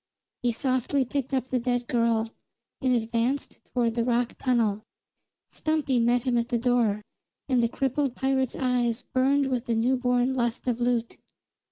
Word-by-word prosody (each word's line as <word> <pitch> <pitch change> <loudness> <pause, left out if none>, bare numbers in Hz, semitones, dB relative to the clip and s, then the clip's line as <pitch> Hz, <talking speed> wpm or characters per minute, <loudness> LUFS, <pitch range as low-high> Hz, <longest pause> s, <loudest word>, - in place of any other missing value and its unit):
He 245 - +2
softly 260 +2 0
picked 275 +1 -3
up 260 -2 0
the 255 -1 -1
dead 245 0 -1
girl, 230 -2 +1 0.5
and 255 -2 +2
advanced 235 +4 -1
toward 235 -2 0
the 235 0 0
rock 240 0 +1
tunnel. 230 -5 +1 0.7
Stumpy 305 -5 0
met 240 +1 +2
him 245 -2 +1
at 235 0 -2
the 240 - +1
door, 230 -4 +1 0.4
and 255 -3 +2
the 230 - +2
crippled 270 +1 -1
pirate's 265 -1 0
eyes 245 -2 0
burned 275 +2 +2
with 250 -1 -1
the 230 - 0
newborn 250 +2 +2
lust 240 -2 -1
of 245 -2 0
loot. 240 -1 0
245 Hz, 160 wpm, -26 LUFS, 235-260 Hz, 0.7 s, He